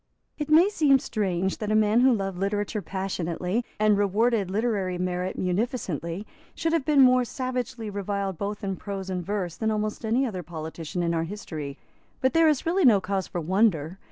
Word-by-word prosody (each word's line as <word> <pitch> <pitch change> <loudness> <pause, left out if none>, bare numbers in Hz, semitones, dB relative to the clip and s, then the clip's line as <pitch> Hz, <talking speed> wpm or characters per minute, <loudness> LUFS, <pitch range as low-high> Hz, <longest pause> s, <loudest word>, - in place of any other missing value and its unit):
It 295 - -3
may 325 +5 +7
seem 300 -9 +4
strange 190 -6 -1
that 215 -1 -2
a - - +3
man 215 +1 +4
who 260 +1 +5
loved 195 -5 -1
literature 205 +2 -1
passionately, 185 +2 -2 0.2
and 210 -1 +4
rewarded 205 0 +2
literary 200 -3 -1
merit 180 +1 -2
munificently, 185 - -2 0.3
should 325 0 -1
have 325 -5 +1
been 290 -2 +5
more 255 -1 +6
savagely 250 -2 -4
reviled 200 -1 -3
both 205 +1 -4
in 195 -2 -2
prose 195 -1 -5
and 180 -1 -2
verse 185 -3 -3
than 220 - 0
almost 215 0 -2
any 235 +5 +2
other 195 -7 -4
politician 160 +1 -5
in 170 0 0
our 165 0 0
history. 155 -7 -6 0.4
But 260 - +1
there 330 -1 +5
is 295 -4 0
really 355 +3 +2
no 230 -8 +6
cause 190 0 -2
for 175 - -4
wonder. 185 -1 +1
205 Hz, 185 wpm, -26 LUFS, 185-235 Hz, 0.4 s, may